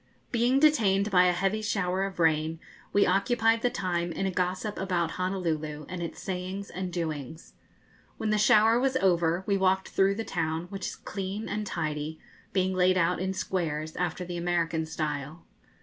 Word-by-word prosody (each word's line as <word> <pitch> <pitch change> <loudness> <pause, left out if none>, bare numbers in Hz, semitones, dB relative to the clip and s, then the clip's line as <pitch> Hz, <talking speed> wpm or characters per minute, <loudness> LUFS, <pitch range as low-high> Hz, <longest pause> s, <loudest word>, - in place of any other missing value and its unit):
Being 245 +3 +3
detained 215 -10 +3
by 180 -1 +6
a 180 - +5
heavy 195 +4 0
shower 195 -3 0
of 195 -2 -7
rain, 160 0 +2 0.3
we 200 - +4
occupied 225 +4 +2
the 245 - +2
time 175 -5 -2
in 195 - -2
a 190 - 0
gossip 185 +3 -2
about 175 -4 0
Honolulu 160 -5 -2
and 180 -1 -5
its 170 - -5
sayings 190 +2 -4
and 185 0 -4
doings. 160 -3 -5 0.6
When 215 - -1
the 215 - +2
shower 220 +2 +5
was 265 0 +1
over, 175 -4 +2
we 200 -1 +2
walked 190 0 +2
through 195 +1 +2
the 225 +1 -4
town, 160 -1 -2
which 195 -2 -4
is - - -5
clean 200 +2 -5
and 210 +1 -3
tidy, 155 -2 -3 0.3
being 185 -1 +1
laid 185 0 +3
out 180 0 +2
in 190 +1 -2
squares, 160 -5 -2
after 180 0 -2
the 175 0 -5
American 170 -2 0
style. 155 0 -4
185 Hz, 175 wpm, -28 LUFS, 165-200 Hz, 0.6 s, by